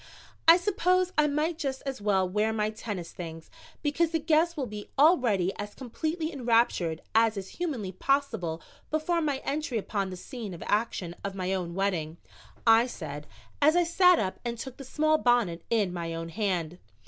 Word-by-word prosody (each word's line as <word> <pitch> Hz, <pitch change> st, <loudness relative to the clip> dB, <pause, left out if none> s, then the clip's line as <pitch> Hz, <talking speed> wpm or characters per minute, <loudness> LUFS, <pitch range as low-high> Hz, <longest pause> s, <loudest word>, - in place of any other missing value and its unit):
"I 330 Hz, +1 st, +10 dB
suppose 365 Hz, -1 st, +1 dB
I 300 Hz, -1 st, +4 dB
might 305 Hz, +3 st, -1 dB
just 270 Hz, -4 st, -3 dB
as 270 Hz, -6 st, -4 dB
well 195 Hz, -2 st, +2 dB
wear 210 Hz, +4 st, +1 dB
my 215 Hz, -1 st, 0 dB
tennis 205 Hz, -6 st, -6 dB
things, 165 Hz, -2 st, -8 dB, 0.3 s
because 310 Hz, +3 st, +2 dB
the 325 Hz, -, 0 dB
guests 325 Hz, +2 st, +2 dB
will 275 Hz, -, -1 dB
be 210 Hz, -2 st, -8 dB
already 245 Hz, -, +4 dB
as 205 Hz, 0 st, -6 dB
completely 315 Hz, +6 st, -3 dB
enraptured 230 Hz, -, +1 dB
as 225 Hz, -1 st, +3 dB
is 195 Hz, -1 st, -5 dB
humanly 270 Hz, -, -3 dB
possible 185 Hz, -, -1 dB, 0.3 s
before 325 Hz, +2 st, 0 dB
my 285 Hz, -4 st, -1 dB
entry 290 Hz, -3 st, -1 dB
upon 200 Hz, -2 st, -2 dB
the 185 Hz, -, -7 dB
scene 220 Hz, -3 st, -7 dB
of -, -, -8 dB
action 205 Hz, -5 st, -1 dB
of 200 Hz, -1 st, -4 dB
my 185 Hz, 0 st, -1 dB
own 175 Hz, -2 st, -3 dB
wedding," 175 Hz, -5 st, -1 dB, 0.5 s
I 225 Hz, +1 st, +6 dB
said, 150 Hz, -, -7 dB, 0.3 s
as 305 Hz, +3 st, +5 dB
I 350 Hz, -, +5 dB
sat 360 Hz, +1 st, +5 dB
up 190 Hz, -8 st, -2 dB
and 235 Hz, -1 st, -3 dB
took 260 Hz, +2 st, -7 dB
the 275 Hz, -, -8 dB
small 310 Hz, +4 st, +2 dB
bonnet 230 Hz, -9 st, +2 dB
in 210 Hz, -6 st, +1 dB
my 165 Hz, -1 st, -4 dB
own 165 Hz, 0 st, -5 dB
hand. 180 Hz, -4 st, -2 dB
225 Hz, 180 wpm, -28 LUFS, 185-300 Hz, 0.5 s, I